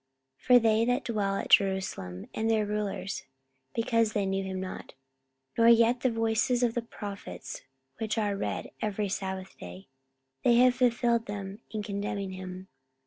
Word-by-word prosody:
44:013:027 -, -, -21 dB
For 250 Hz, -1 st, +8 dB
they 225 Hz, 0 st, +4 dB
that 245 Hz, +3 st, +1 dB
dwell 205 Hz, -4 st, 0 dB
at -, -, -3 dB
Jerusalem, 190 Hz, -, +2 dB
and 225 Hz, +1 st, -1 dB
their 220 Hz, -1 st, +2 dB
rulers, 205 Hz, -2 st, -3 dB, 0.5 s
because 230 Hz, -1 st, +2 dB
they 205 Hz, -2 st, +1 dB
knew 195 Hz, 0 st, -1 dB
him 190 Hz, -1 st, -4 dB
not, 185 Hz, -6 st, -7 dB, 0.6 s
nor 230 Hz, -, +4 dB
yet 235 Hz, +1 st, +6 dB
the 255 Hz, -, +2 dB
voices 225 Hz, +2 st, +1 dB
of 235 Hz, -2 st, +2 dB
the 240 Hz, -, -1 dB
prophets 200 Hz, -, -7 dB, 0.4 s
which 220 Hz, 0 st, -2 dB
are 205 Hz, -2 st, +1 dB
read 200 Hz, -, -3 dB
every 210 Hz, -1 st, -1 dB
sabbath 190 Hz, -1 st, -4 dB
day, 90 Hz, +5 st, -10 dB, 0.5 s
they 240 Hz, -, +5 dB
have 250 Hz, +1 st, +6 dB
fulfilled 240 Hz, -2 st, +2 dB
them 200 Hz, 0 st, -5 dB
in 215 Hz, -1 st, -4 dB
condemning 200 Hz, -1 st, -3 dB
him. 185 Hz, 0 st, -7 dB
210 Hz, 160 wpm, -29 LUFS, 195-230 Hz, 0.6 s, For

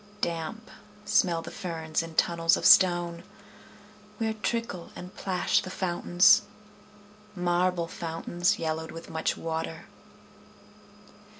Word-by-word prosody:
Damp 170 Hz, +6 st, -4 dB, 0.3 s
smell 180 Hz, -6 st, +2 dB
the 170 Hz, -, -8 dB
ferns 160 Hz, -3 st, -3 dB
in 165 Hz, -1 st, -9 dB
tunnels 165 Hz, -1 st, +3 dB
of -, -, -4 dB
stone, 175 Hz, -2 st, +5 dB, 1.0 s
Where 220 Hz, 0 st, -1 dB
trickle 220 Hz, -4 st, -3 dB
and 180 Hz, +1 st, -9 dB
plash 185 Hz, -2 st, 0 dB
the 185 Hz, -, -8 dB
fountains, 180 Hz, +2 st, +4 dB, 0.9 s
Marble 175 Hz, -1 st, 0 dB
fountains, 175 Hz, +4 st, -1 dB
yellowed 160 Hz, 0 st, -3 dB
with 165 Hz, +1 st, -9 dB
much 160 Hz, 0 st, -1 dB
water. 160 Hz, 0 st, -4 dB
175 Hz, 105 wpm, -27 LUFS, 165-185 Hz, 1.0 s, stone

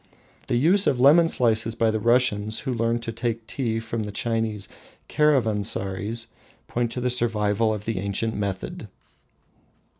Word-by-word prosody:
The -, -, 0 dB
use 175 Hz, +11 st, +3 dB
of 125 Hz, -, +2 dB
lemon 155 Hz, +6 st, +6 dB
slices 115 Hz, -5 st, +2 dB
by 115 Hz, -1 st, +2 dB
the 110 Hz, -, -1 dB
Russians, 110 Hz, -2 st, +1 dB
who 130 Hz, -, -3 dB
learned 115 Hz, 0 st, -1 dB
to 115 Hz, -, -4 dB
take 115 Hz, 0 st, -3 dB
tea 115 Hz, -2 st, -2 dB
from 115 Hz, 0 st, -4 dB
the 105 Hz, -1 st, -4 dB
Chinese 110 Hz, -1 st, -2 dB, 0.4 s
caravansaries, 110 Hz, -5 st, 0 dB, 0.4 s
points 120 Hz, -1 st, -2 dB
to 125 Hz, -, -3 dB
the 125 Hz, 0 st, 0 dB
survival 110 Hz, -2 st, +1 dB
of 105 Hz, -1 st, -4 dB
the 115 Hz, -4 st, -2 dB
ancient 100 Hz, +3 st, -2 dB
method. 100 Hz, -2 st, -4 dB
115 Hz, 150 wpm, -24 LUFS, 105-120 Hz, 0.4 s, lemon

